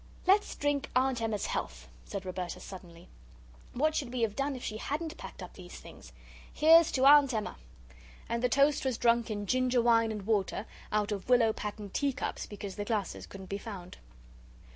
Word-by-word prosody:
"Let's 395 Hz, +3 st, +3 dB
drink 290 Hz, -1 st, -1 dB
Aunt 255 Hz, -2 st, +2 dB
Emma's 220 Hz, -3 st, -1 dB
health," 60 Hz, 0 st, -4 dB, 0.2 s
said 195 Hz, -1 st, -6 dB
Roberta, 185 Hz, -1 st, -4 dB
suddenly; 175 Hz, -3 st, -11 dB, 0.7 s
"what 310 Hz, +5 st, +1 dB
should 270 Hz, -5 st, -2 dB
we 250 Hz, -1 st, -3 dB
have 215 Hz, -2 st, 0 dB
done 275 Hz, 0 st, -1 dB
if 250 Hz, -, -8 dB
she 215 Hz, -, -4 dB
hadn't 310 Hz, +7 st, -4 dB
packed -, -, -9 dB
up -, -, -10 dB
these -, -, -11 dB
things? -, -, -13 dB, 0.4 s
Here's 325 Hz, +1 st, +6 dB
to 260 Hz, 0 st, +2 dB
Aunt 280 Hz, -3 st, +7 dB
Emma!" 215 Hz, -, -3 dB, 0.7 s
And 235 Hz, 0 st, -2 dB
the 250 Hz, -, +2 dB
toast 280 Hz, +3 st, +3 dB
was 260 Hz, -4 st, -1 dB
drunk 235 Hz, -1 st, +2 dB
in 205 Hz, -1 st, -3 dB
ginger 255 Hz, +2 st, +2 dB
wine 230 Hz, -1 st, +4 dB
and 210 Hz, -3 st, -6 dB
water, 210 Hz, -1 st, 0 dB, 0.3 s
out 210 Hz, 0 st, 0 dB
of 200 Hz, +2 st, -4 dB
willow 235 Hz, -3 st, +5 dB
patterned 210 Hz, -2 st, -6 dB
tea 280 Hz, -1 st, +1 dB
cups, 260 Hz, -, -4 dB
because 200 Hz, -2 st, -7 dB
the 205 Hz, -, -3 dB
glasses 210 Hz, -4 st, -3 dB
couldn't 195 Hz, -1 st, -10 dB
be 200 Hz, -, -3 dB
found. 195 Hz, -5 st, -9 dB
230 Hz, 185 wpm, -30 LUFS, 205-265 Hz, 0.7 s, Aunt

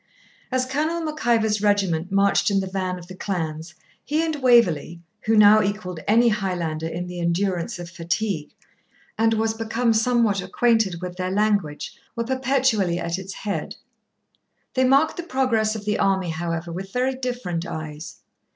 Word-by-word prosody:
As 255 Hz, 0 st, +1 dB
Colonel 310 Hz, +6 st, -1 dB
Mac 310 Hz, -6 st, -4 dB
Ivor's 220 Hz, -3 st, +2 dB
regiment 190 Hz, -4 st, +1 dB
marched 200 Hz, +1 st, +3 dB
in 200 Hz, -1 st, +2 dB
the 190 Hz, -, -2 dB
van 185 Hz, -1 st, -3 dB
of 175 Hz, -, -10 dB
the 185 Hz, -, -10 dB
clans, 165 Hz, -3 st, -4 dB, 0.3 s
he 310 Hz, +3 st, 0 dB
and 320 Hz, -1 st, -1 dB
Waverley, 185 Hz, -, +3 dB, 0.3 s
who 225 Hz, 0 st, +4 dB
now 210 Hz, +1 st, +8 dB
equalled 195 Hz, -4 st, -3 dB
any 230 Hz, +3 st, +5 dB
Highlander 175 Hz, -7 st, -2 dB
in 170 Hz, +2 st, -4 dB
the 180 Hz, 0 st, -7 dB
endurance 175 Hz, +4 st, -1 dB
of 175 Hz, -1 st, -7 dB
fatigue, 170 Hz, 0 st, -3 dB, 0.6 s
and 225 Hz, 0 st, +2 dB
was 220 Hz, 0 st, +1 dB
become 225 Hz, +1 st, 0 dB
somewhat 225 Hz, -3 st, +2 dB
acquainted 195 Hz, -2 st, +1 dB
with 180 Hz, 0 st, -6 dB
their 185 Hz, 0 st, -2 dB
language, 200 Hz, -6 st, 0 dB, 0.2 s
were 235 Hz, -, -1 dB
perpetually 260 Hz, -8 st, +1 dB
at 170 Hz, +1 st, -2 dB
its 190 Hz, 0 st, -7 dB
head. 205 Hz, -1 st, -4 dB, 1.0 s
They 260 Hz, 0 st, +2 dB
marked 275 Hz, +4 st, +3 dB
the -, -, -2 dB
progress 250 Hz, -8 st, 0 dB
of 210 Hz, -2 st, -6 dB
the 210 Hz, 0 st, 0 dB
army, 190 Hz, -3 st, +1 dB
however, 165 Hz, +1 st, -3 dB
with 190 Hz, +3 st, -6 dB
very 255 Hz, +3 st, 0 dB
different 245 Hz, -10 st, -3 dB
eyes. 155 Hz, -1 st, -7 dB
200 Hz, 160 wpm, -23 LUFS, 175-235 Hz, 1.0 s, now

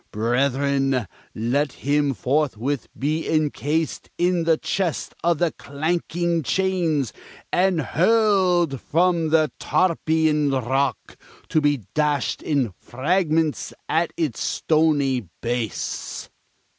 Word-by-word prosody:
Brethren, 135 Hz, +2 st, +1 dB, 0.3 s
let 130 Hz, +6 st, 0 dB
him 145 Hz, -1 st, 0 dB
forthwith 140 Hz, -1 st, -1 dB
be 155 Hz, +4 st, -1 dB
encased 155 Hz, 0 st, -1 dB
in 175 Hz, -1 st, +1 dB
the 165 Hz, -1 st, +4 dB
Chest 180 Hz, -2 st, -2 dB
of 170 Hz, -1 st, +2 dB
the 170 Hz, 0 st, +1 dB
Clanking 170 Hz, +4 st, -1 dB
Chains, 165 Hz, -, 0 dB, 0.4 s
and 185 Hz, -1 st, +3 dB
hurled 180 Hz, -, +2 dB
from 170 Hz, -1 st, +1 dB
the 155 Hz, -1 st, +3 dB
Tarpeian 160 Hz, -4 st, +2 dB
Rock, 135 Hz, +1 st, -1 dB, 0.3 s
to 155 Hz, -, +2 dB
be 145 Hz, -5 st, +1 dB
dashed 150 Hz, -3 st, 0 dB
in 135 Hz, -, 0 dB
fragments 160 Hz, 0 st, 0 dB
at 165 Hz, +1 st, +1 dB
its 155 Hz, -9 st, -1 dB
stony 145 Hz, -, +1 dB
base!" 120 Hz, -2 st, -3 dB
150 Hz, 100 wpm, -23 LUFS, 135-170 Hz, 0.4 s, the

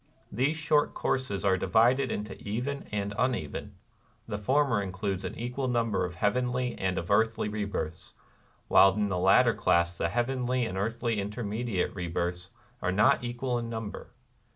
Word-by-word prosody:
These 135 Hz, +8 st, +1 dB
short 150 Hz, -1 st, +2 dB
courses 130 Hz, -7 st, -1 dB
are 95 Hz, -1 st, +3 dB
divided 120 Hz, +5 st, +3 dB
into 105 Hz, 0 st, -4 dB
Even 125 Hz, +7 st, -3 dB
and 100 Hz, -1 st, -2 dB
Uneven; 125 Hz, -, -2 dB, 0.3 s
— -, -, -37 dB
the 105 Hz, -2 st, -3 dB
former 130 Hz, 0 st, +2 dB
includes 95 Hz, 0 st, -3 dB
an -, -, -5 dB
equal 125 Hz, +3 st, -3 dB
number 115 Hz, -3 st, +1 dB
of 90 Hz, -1 st, -6 dB
heavenly 125 Hz, +4 st, 0 dB
and 95 Hz, -1 st, -1 dB
of 85 Hz, +2 st, -3 dB
earthly 110 Hz, +1 st, +2 dB
rebirths; 100 Hz, -7 st, -4 dB, 0.5 s
while 95 Hz, 0 st, +6 dB
in 105 Hz, -1 st, 0 dB
the 90 Hz, -2 st, -1 dB
latter 115 Hz, +6 st, +5 dB
class 85 Hz, 0 st, +2 dB
the 85 Hz, -, +1 dB
heavenly 125 Hz, +3 st, 0 dB
and 110 Hz, -, -4 dB
the 95 Hz, -, -1 dB
earthly 115 Hz, 0 st, -1 dB
intermediate 105 Hz, 0 st, -2 dB
rebirths 90 Hz, 0 st, -3 dB, 0.3 s
are 90 Hz, -, 0 dB
not 105 Hz, +5 st, +4 dB
equal 120 Hz, +1 st, -2 dB
in 115 Hz, -1 st, -5 dB
number. 110 Hz, -2 st, -6 dB
110 Hz, 160 wpm, -29 LUFS, 95-125 Hz, 0.5 s, while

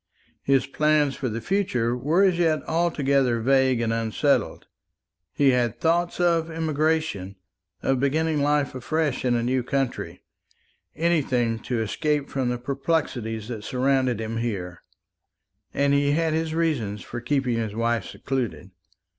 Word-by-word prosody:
His 135 Hz, -1 st, +2 dB
plans 150 Hz, 0 st, +2 dB
for 130 Hz, -, -3 dB
the 115 Hz, +1 st, -4 dB
future 125 Hz, -, 0 dB
were 155 Hz, +10 st, +2 dB
as 185 Hz, -3 st, +3 dB
yet 160 Hz, -3 st, +2 dB
altogether 140 Hz, -7 st, +1 dB
vague 130 Hz, 0 st, +3 dB
and 115 Hz, -1 st, 0 dB
unsettled. 115 Hz, -1 st, 0 dB, 0.7 s
He 140 Hz, -1 st, +3 dB
had 120 Hz, -3 st, 0 dB
thoughts 170 Hz, +2 st, +1 dB
of 170 Hz, -2 st, +2 dB
emigration, 155 Hz, -, -1 dB, 0.5 s
of 135 Hz, -1 st, +1 dB
beginning 155 Hz, +2 st, +1 dB
life 145 Hz, -1 st, +1 dB
afresh 145 Hz, +2 st, -1 dB
in 125 Hz, -1 st, +2 dB
a 120 Hz, -, 0 dB
new 130 Hz, +2 st, +1 dB
country 135 Hz, +1 st, -3 dB, 0.7 s
anything 130 Hz, -9 st, +1 dB
to 115 Hz, 0 st, -2 dB
escape 145 Hz, +6 st, -1 dB
from 130 Hz, -3 st, -1 dB
the 125 Hz, -, -1 dB
perplexities 120 Hz, -5 st, -2 dB
that 110 Hz, -4 st, -5 dB
surrounded 130 Hz, -1 st, +1 dB
him 110 Hz, 0 st, -3 dB
here; 95 Hz, -7 st, -4 dB, 0.9 s
and 140 Hz, 0 st, +1 dB
he 140 Hz, 0 st, +3 dB
had 160 Hz, 0 st, +1 dB
his 160 Hz, 0 st, -1 dB
reasons 125 Hz, -12 st, -1 dB
for 120 Hz, -, -6 dB
keeping 125 Hz, -2 st, 0 dB
his 110 Hz, -2 st, -3 dB
wife 115 Hz, 0 st, 0 dB
secluded. 120 Hz, -8 st, -4 dB
135 Hz, 140 wpm, -24 LUFS, 120-155 Hz, 0.9 s, as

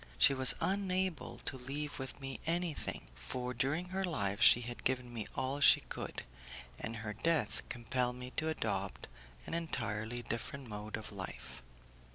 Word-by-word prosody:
She 140 Hz, -, +6 dB
was 130 Hz, -1 st, +6 dB
unable 190 Hz, -3 st, 0 dB
to 135 Hz, -, -2 dB
leave 145 Hz, +4 st, -4 dB, 0.2 s
me 135 Hz, -1 st, -5 dB
anything, 170 Hz, -, +1 dB
for 125 Hz, -, -4 dB
during 140 Hz, +9 st, 0 dB
her 190 Hz, +1 st, -1 dB
life 105 Hz, -, -1 dB
she 120 Hz, -, +8 dB
had 120 Hz, 0 st, -6 dB
given 125 Hz, -2 st, 0 dB
me 115 Hz, -3 st, -4 dB
all 135 Hz, +2 st, -1 dB
she 140 Hz, -, +9 dB
could, -, -, -5 dB, 0.6 s
and 115 Hz, -, -3 dB
her 110 Hz, -1 st, -4 dB
death 145 Hz, 0 st, +2 dB
compelled 125 Hz, +1 st, -1 dB
me 125 Hz, 0 st, -7 dB
to 155 Hz, +3 st, 0 dB
adopt 160 Hz, -, -2 dB, 0.4 s
an -, -, -6 dB
entirely 120 Hz, -7 st, -2 dB
different 125 Hz, +4 st, -4 dB
mode 105 Hz, 0 st, -5 dB
of 110 Hz, -2 st, -8 dB
life. 95 Hz, -12 st, -6 dB
125 Hz, 155 wpm, -35 LUFS, 115-155 Hz, 0.6 s, she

